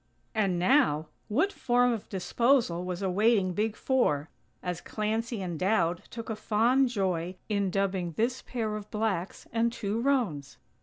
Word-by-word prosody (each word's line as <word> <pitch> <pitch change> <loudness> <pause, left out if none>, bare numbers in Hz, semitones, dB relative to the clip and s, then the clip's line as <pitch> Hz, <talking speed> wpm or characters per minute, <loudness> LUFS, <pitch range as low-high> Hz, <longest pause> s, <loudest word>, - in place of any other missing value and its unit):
And 200 -5 +1
now!! 175 - +3 0.2
What 315 - +1
form 245 0 +2
of 220 - -6
disposal 195 0 +2
was 180 +1 -4
awaiting 195 0 +2
"Big 215 +3 0
Four", 160 - +1 0.3
as 180 -1 -3
Clancy 220 0 -2
and 175 -4 -4
Dowd 180 -3 +1
took 230 -1 -7
a 220 - -2
fond 235 +5 +2
joy 185 -5 -1
in 200 -2 +1
dubbing 185 -2 -1
this 235 +7 0
pair 220 -4 -3
of 210 -1 -7
blacks 210 -5 -2
and 230 +1 +2
two 220 0 -2
roans? 215 - 0
210 Hz, 150 wpm, -29 LUFS, 180-235 Hz, 0.3 s, now